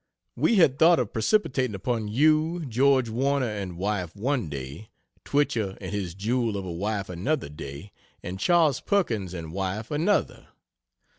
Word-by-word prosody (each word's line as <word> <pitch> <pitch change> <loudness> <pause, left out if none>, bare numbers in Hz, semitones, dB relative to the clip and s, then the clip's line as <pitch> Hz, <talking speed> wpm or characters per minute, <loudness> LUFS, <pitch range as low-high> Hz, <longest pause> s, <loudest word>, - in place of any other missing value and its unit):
We 235 - +2
had 160 -8 +4
thought 170 +1 +6
of 120 -5 -2
precipitating 130 - +1
upon 110 +2 -2
you 155 +7 +2
George 130 0 +3
Warner 135 +4 0
and 100 -6 -4
wife 95 -2 -2
one 120 - -1
day; 70 +8 -7 0.3
Twichell 115 -9 0
and - - -6
his 95 -4 -3
jewel 115 +1 0
of 95 - -5
a 90 - -5
wife 100 +3 -2
another 95 - -2
day, 75 +5 -9 0.3
and 90 +2 -5
Chas. 155 - +3
Perkins 110 - 0
and 80 -2 -7
wife 100 +3 -3
another. 170 +8 0
110 Hz, 150 wpm, -26 LUFS, 95-140 Hz, 0.3 s, thought